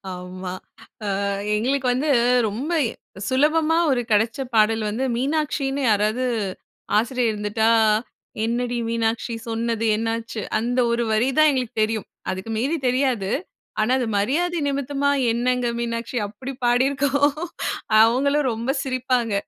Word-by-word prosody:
ஆமா. 180 0 -7 0.7
ஆ - - -1 0.3
எங்களுக்கு 255 +4 0
வந்து 275 +5 -1 0.4
ரொம்ப 245 +11 -4 0.2
இ - - -3 0.4
சுலபமா 310 +4 +3
ஒரு 250 -2 +1
கெடச்ச 220 +4 +2 0.2
பாடல் 220 0 +3
வந்து, 225 +5 -2
மீனாட்சின்னு 280 +1 -1
யாராவது 215 +4 +1 0.7
ஆசிரியர் 240 +1 +1
இருந்துட்டா, 210 +2 0 0.8
"என்னடி 240 +1 -1
மீனாட்சி, 230 +1 -1
சொன்னது 230 0 -1
என்னாச்சு" 225 0 -3 0.2
அந்த 245 +3 -1
ஒரு 235 0 +1
வரி 220 +4 +2
தான் 310 0 +7
எங்களுக்கு 250 -3 -2
தெரியும். 220 -1 -2 0.2
அதுக்கு 190 +4 -4
மீறி 275 +9 0
தெரியாது. 250 -6 +1 0.5
ஆனா 230 +4 +2
அது 250 - 0
மரியாதை 330 +12 0
நிமித்தமா, 280 0 -1 0.2
"என்னங்க 245 +1 0
மீனாட்சி" 235 +1 -3
அப்படி 255 +6 -7
பாடி 245 +2 +4
இருக்கோம். 285 +1 +2 0.7
அவங்களும் 270 +4 +2
ரொம்ப 230 +3 -4
சிரிப்பாங்க. 255 -4 0
245 Hz, 125 wpm, -23 LUFS, 225-270 Hz, 0.8 s, தான்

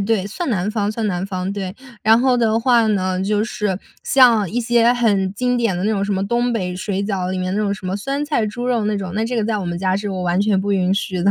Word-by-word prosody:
对， 200 -1 0
算 270 - -4
南 200 -3 0
方 210 -2 -1
算 220 0 -2
南 180 -1 -2
方， 185 -1 -3
对， 195 -1 -5 0.3
然 220 +2 +5
后 255 -1 +3
的 225 -2 +2
话 235 -1 +4
呢， 185 -3 0
就 210 +1 +1
是 210 -4 -2 0.2
像 235 -8 +4
一 245 - -1
些 235 0 +3
很 205 -6 +1
经 250 +4 0
典 230 -6 +1
的 180 - -3
那 215 - +1
种 200 -2 0
什 200 - -2
么， 195 +1 -1
东 240 +2 0
北 180 -5 -2
水 195 0 -2
饺 190 -3 -2
里 185 - -2
面 185 +1 -2
那 210 - 0
种 205 -2 0
什 190 -2 -6
么 185 +2 -1
酸 275 +7 -3
菜 290 -7 0
猪 240 +4 -4
肉 235 -4 +1
那 210 - 0
种， 185 -3 -5
那 220 +2 0
这 245 +2 -2
个 225 - +1
在 220 0 0
我 200 - -3
们 175 0 -3
家 190 0 +1
是 205 0 -3
我 185 -1 -3
完 175 0 0
全 205 -2 +2
不 200 +1 -1
允 185 -1 +1
许 190 -2 -2
的。 200 - +4
205 Hz, 305 characters per minute, -20 LUFS, 190-230 Hz, 0.3 s, 然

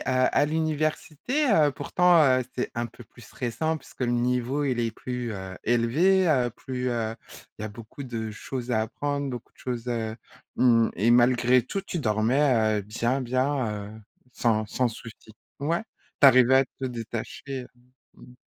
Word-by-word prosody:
à 130 +2 +2
l'université, 155 - -1
heu, 150 -5 +5
pourtant, 180 +2 +3
heu, 130 -2 +4
c'est 125 - -1
un 120 0 -2
peu 120 +1 -14
plus 120 - -18
stressant 145 +9 -2
puisque - - -16
le 125 - +1
niveau, 125 +3 0
il 125 -4 0
est 115 -1 0
plus, 125 +1 -5
heu, 95 -2 -7
élevé, 155 +12 +3 0.3
plus, 125 -1 -4
heu, 115 -2 -2 0.4
il - - -6
y - - -3
a - - -3
beaucoup 110 +6 -10
de 115 -4 -4
choses 125 +3 -6
à 110 - +2
apprendre, 140 +5 -3
beaucoup 120 -2 -8
de - - -35
choses, 125 -1 -4
heu, 115 -2 -2 0.4
mmh, 115 -3 +4
et 110 +6 +2
malgré 125 +1 +4
tout, 195 +11 -4
tu 190 -2 -5
dormais, 110 -1 +2
heu, - - -8
bien 120 +6 -1
bien, 130 -5 -1
heu, 110 - -12 0.3
sans 110 -3 +1
sans 125 +3 0
souci. 115 -1 -11 0.3
Ouais? 165 +7 0 0.4
Tu - - +9
arrivais 130 -1 +6
à 135 - +5 0.2
te 130 - -1
détacher? 125 +2 -6 0.5
Mmh. 125 - -16
125 Hz, 170 wpm, -26 LUFS, 115-140 Hz, 0.5 s, Tu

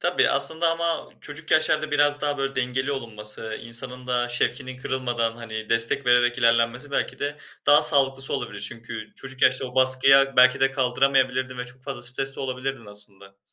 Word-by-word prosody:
Tabii, - - +2
aslında 165 +1 +2
ama 165 0 -2
çocuk 150 +2 -9
yaşlarda 155 -1 +2
biraz 145 0 +2
daha 145 -1 -1
böyle 135 0 -2
dengeli 130 +2 -1
olunması, 110 -3 -5
insanın 125 +2 -5
da 120 -1 0
şevkinin 130 +1 -2
kırılmadan, 120 -3 -2
hani 110 -2 -7
destek 115 +4 +1
vererek 120 0 +3
ilerlenmesi 115 +3 +1
belki - - -2
de 145 0 -3 0.3
daha 145 - +6
sağlıklısı 135 -2 +3
olabilir. - - -5
Çünkü 115 -2 -7
çocuk 135 0 -10
yaşta 130 +1 +3
o 125 -1 -8
baskıya 135 +1 +4
belki 130 +2 +6
de 135 0 +3
kaldıramayabilirdin 130 -1 +1
ve 125 - -3
çok 125 +1 -12
fazla 135 -3 -6
stres 135 +3 0
de - - -6
olabilirdin 130 -2 -4
aslında. 100 -1 -7
130 Hz, 170 wpm, -24 LUFS, 120-135 Hz, 0.3 s, daha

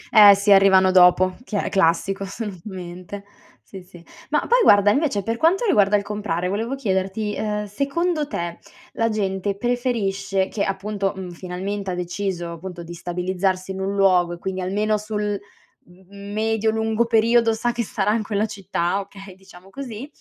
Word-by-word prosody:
Eh 205 -2 +10
sì, 200 +1 +1
arrivano 190 -1 +6
dopo, 185 0 +5
che 210 -5 -3
è - - -2
classico 195 +2 +1
assolutamente. 190 -2 -7 0.4
Sì, 190 -2 -11
sì. 175 -2 -16 0.3
Ma - - +2
poi - - +2
guarda, 205 - +6
invece, 270 -8 0
per 230 +1 -2
quanto 375 - +2
riguarda 210 - +3
il 200 - -3
comprare, 200 -4 -3
volevo 225 +7 -2
chiederti, 205 -2 -2
uhm, 210 -1 -2
secondo 295 - -1
te, 170 - -5 0.3
la 230 0 0
gente 195 -1 -2
preferisce 200 -6 -1
che, 200 - -2
appunto, 195 0 -2
mhmm, 185 -2 -6
finalmente 190 +3 -5
ha - - -3
deciso 180 -1 -3
appunto 175 +1 -8
di 170 +1 -9
stabilizzarsi 185 +2 -2
in 190 0 -5
un 195 +1 -2
luogo 180 -3 +3
e - - -7
quindi 190 +1 -4
almeno 210 +3 0
sul, 210 -1 -3 0.5
mhmm, 195 +3 -13
medio 220 +1 0
lungo 220 +1 0
periodo 230 0 +3
sa 240 +2 -1
che 235 0 -2
sarà 210 0 -1
in 225 - 0
quella 210 0 -1
città, 195 -3 -2
okay 195 -1 -10
diciamo 190 0 -17
così, 260 -1 -7
200 Hz, 165 wpm, -22 LUFS, 185-215 Hz, 0.5 s, Eh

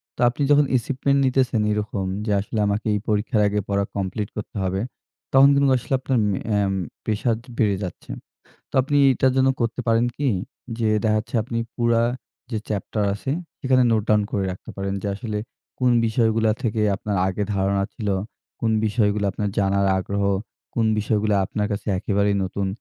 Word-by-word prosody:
তো - - -6
আপনি 135 - -6
যখন 145 0 +6
acheivement 140 +3 0
নিতেছেন 130 -3 +2
এরকম 105 -2 -2 0.2
যে 105 - -1
আসলে 105 +2 -3
আমাকে 105 +2 -1
এই 105 - +1
পরীক্ষার 105 +1 +1
আগে 105 0 0
পড়া 100 0 +1
কমপ্লিট 100 +1 -2
করতে 105 - -6
হবে, 95 +1 -1 0.5
তখন 135 +1 +8
কিন্তু 140 -1 +3
আসলে 125 - -4
আপনার 130 -1 0
ম - - +1 0.2
এ্যাম 100 -2 +1 0.3
প্রেশার 110 +2 0 0.2
বেড়ে 105 -3 +2
যাচ্ছে। 90 - -7 0.6
তো - - -28
আপনি 145 +2 0 0.2
এটার 130 +1 +2
জন্য 130 0 +4
করতে 115 +2 -1
পারেন 115 +1 +3
কি? 145 -2 0 0.5
যে 110 -2 +1 0.2
দেখাচ্ছে 110 +2 0
আপনি 115 0 -4 0.2
পুরা 115 -1 +2 0.5
যে 110 - -1
চ্যাপ্টার 105 0 -2
আছে 130 +6 -4 0.3
সেখানে 130 -1 +3
নোট 110 -2 +2
ডাউন 105 -1 +4
করে 100 -2 -1
রাখতে 90 - -8
পারেন 100 0 -2
যে - - -3
আসলে 105 -1 -4 0.4
কোন 125 -1 +4 0.2
বিষয়গুলা 110 -1 +2
থেকে 110 -2 0 0.2
আপনার 100 -1 -3
আগে 100 +2 -2
ধারণা 100 0 +1
ছিল, 105 -2 -4 0.5
কোন 115 - +1 0.2
বিষয়গুলো 105 -1 +1
আপনার 105 -1 -2
জানার 100 0 +2
আগ্রহ, 100 +2 -2 0.5
কোন 115 -2 +2
বিষয়গুলো 105 0 +1
আপনার 105 +1 -2
কাছে 100 - -4
একেবারেই 100 +1 +1
নতুন। 95 +1 -2
110 Hz, 170 wpm, -23 LUFS, 100-120 Hz, 0.6 s, তখন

